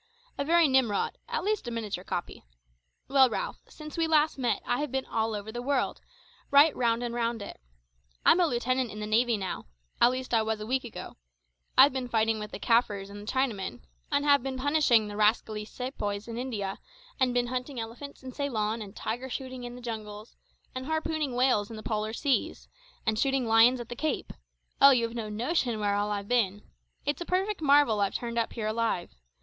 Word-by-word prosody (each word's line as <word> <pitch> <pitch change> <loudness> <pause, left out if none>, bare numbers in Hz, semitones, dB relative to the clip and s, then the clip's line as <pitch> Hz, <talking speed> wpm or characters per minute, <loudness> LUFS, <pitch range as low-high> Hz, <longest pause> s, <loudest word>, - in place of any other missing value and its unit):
A 280 - -1
very 335 +2 +5
Nimrod 260 -7 +1
at 475 -5 -2
least 420 - -1
a - - -1
miniature 215 -6 -4
copy. 175 - -5 0.6
Well, 265 -1 +5
Ralph, - - -4
since 305 +2 -8
we 325 - +2
last 310 -2 +3
met 245 -2 0
I 245 0 0
have 295 -3 -2
been 265 0 -1
all 220 -1 -1
over 205 +1 -6
the 240 +2 -5
world, 275 +1 -1 0.5
right 285 +2 +6
round 235 -1 +1
and 240 -1 -3
round 230 -2 -1
it. - - -10 0.6
I'm 355 - +6
a 350 - +4
lieutenant 255 -1 0
in 210 - -8
the 210 - -3
navy 230 +2 +2
now 190 - -5 0.3
at 240 - +8
least 255 0 -4
I 225 - +5
was 220 0 -1
a 215 - -5
week 255 +3 0
ago. 240 - -8 0.6
I've 265 +1 +8
been 260 -2 -3
fighting 225 -1 +1
with 210 0 -6
the - - -6
Kaffirs 205 -3 +1
and 205 0 -8
the - - -1
Chinamen, 245 -5 -1 0.3
and 285 -2 +4
been 265 -1 -3
punishing 260 -5 +3
the 205 - -7
rascally 210 0 +1
sepoys 210 -4 -4
in 230 - -6
India, 220 -6 -3 0.4
and 260 -1 +3
been 245 0 +1
hunting 255 +1 -4
elephants 240 +6 -8
in 260 - -7
Ceylon 230 -5 -2
and 200 -2 -9
tiger 245 +4 -4
shooting 255 -1 -5
in 245 0 -7
the 250 - -10
jungles, 215 -2 -7 0.4
and 255 +1 -5
harpooning 315 -4 -1
whales 245 -5 +2
in 225 - -7
the 215 - -8
polar 215 -1 -2
seas, 275 +2 -1 0.4
and 220 -1 +1
shooting 270 -1 +1
lions 230 +3 +5
at 240 - -7
the 240 - -5
Cape; 310 +5 -2 0.5
oh, 275 - +10
you've 235 -4 +2
no 225 -3 -4
notion 240 +1 -1
where 205 -1 +1
all 205 +1 0
I've 200 -1 -3
been. 205 -4 +1 0.4
It's 290 +4 -1
a - - 0
perfect 380 +2 -1
marvel 280 -7 +4
I've 200 - 0
turned 235 -1 -2
up 230 - -1
here 225 -3 -4
alive. 215 -5 -1
240 Hz, 200 wpm, -28 LUFS, 215-265 Hz, 0.6 s, oh